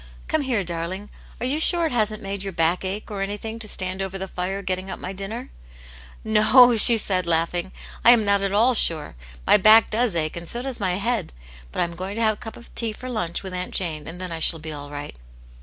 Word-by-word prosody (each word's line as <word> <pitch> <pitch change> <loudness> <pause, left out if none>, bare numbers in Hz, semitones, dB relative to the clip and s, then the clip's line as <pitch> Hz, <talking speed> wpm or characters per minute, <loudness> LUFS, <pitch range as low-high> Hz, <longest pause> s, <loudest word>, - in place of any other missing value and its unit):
Come 315 - 0
here, 250 -7 -1
darling! 175 +4 -5 0.3
Are - - -3
you 280 +4 +1
sure 340 +1 +6
it 320 - -2
hasn't 215 -3 -1
made 195 0 -5
your 195 -1 -5
back 165 +3 0
ache, 195 +3 -5
or 200 -2 -5
anything, 210 +3 -5
to 220 - -6
stand 185 -1 -1
over 195 0 -4
the 190 0 -6
fire 190 +2 -5
getting 185 0 -4
up - - -6
my 185 - -7
dinner 210 +6 -7 0.2
?" - - -19
" - - -21
No," 235 +3 +5
she 230 +1 +9
said, 185 -4 -2
laughing, 170 +2 -1 0.2
" - - -17
I - - +7
am 235 -3 +6
not 200 0 +2
at 195 -1 -1
all 230 +5 +3
sure. 160 - +2 0.3
My - - +6
back 215 +2 +5
does 225 -3 0
ache 155 -2 -2
and 170 -1 -5
so 240 +1 -2
does 265 -2 -6
my 185 -3 -1
head. 210 0 -2 0.4
But - - -3
I - - +4
am 170 0 -5
going 190 +3 -6
to 230 - -3
have 220 -1 +3
a 210 - -15
cup 225 -2 -8
of 235 - -16
tea 230 -2 -2
for 255 +4 -9
lunch, 175 -7 -3
with 190 -1 -7
Aunt 180 0 -5
Jane, 160 -5 -2
and 170 +2 -8
then 185 -1 -6
I 165 - -5
shall 165 +1 +4
be 160 0 -8
all 145 -1 -9
right." 145 - -8
195 Hz, 255 wpm, -22 LUFS, 175-220 Hz, 0.4 s, she